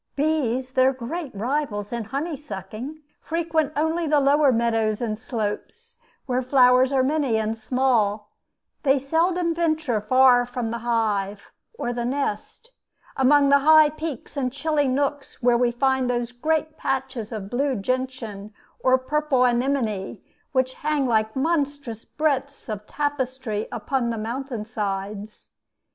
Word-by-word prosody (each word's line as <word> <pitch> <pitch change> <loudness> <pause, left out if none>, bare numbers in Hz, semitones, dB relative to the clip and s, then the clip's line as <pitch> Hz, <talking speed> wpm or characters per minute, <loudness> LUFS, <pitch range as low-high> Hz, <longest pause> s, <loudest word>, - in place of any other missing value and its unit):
Bees, 265 -4 0
their 260 +1 +3
great 275 +6 -5
rivals 230 -2 -2
in 235 -2 -3
honey 285 +8 -3
sucking, 265 - -8 0.2
frequent 320 -2 -1
only 320 +2 0
the 300 0 +4
lower 285 0 +4
meadows 225 -2 +1
and 225 -3 -2
slopes, 250 - -5 0.3
where 255 -1 0
flowers 255 0 +5
are 265 -2 +3
many 275 -4 +1
and 220 0 -1
small: 225 -3 0 0.5
they 275 -1 +3
seldom 335 +5 +1
venture 315 -9 0
far 255 +2 +5
from 245 -2 -3
the 235 - -3
hive 210 -4 -1 0.3
or 240 - -2
the 240 0 -3
nest 275 - -3 0.4
among 280 +1 +4
the 280 0 +6
high 310 +1 +6
peaks 310 -4 -6
and 260 -3 -1
chilly 290 +1 0
nooks 275 +1 -2
where 245 0 +5
we 240 0 +3
find 265 +1 +1
those 240 -1 -1
great 310 +5 -1
patches 260 -4 -3
of 205 -3 -6
blue 270 +2 0
gentian 225 -3 -4 0.2
or 260 0 +4
purple 270 -1 +1
anemone, 240 -5 0 0.3
which 260 -1 +1
hang 300 -1 -1
like 220 -2 +1
monstrous 285 -6 -1
breadths 280 -3 -2
of 210 -2 -5
tapestry 260 -7 -2
upon 260 -4 -1
the 230 - -2
mountain 235 +1 -4
sides. 205 -1 -5
260 Hz, 140 wpm, -24 LUFS, 230-290 Hz, 0.5 s, the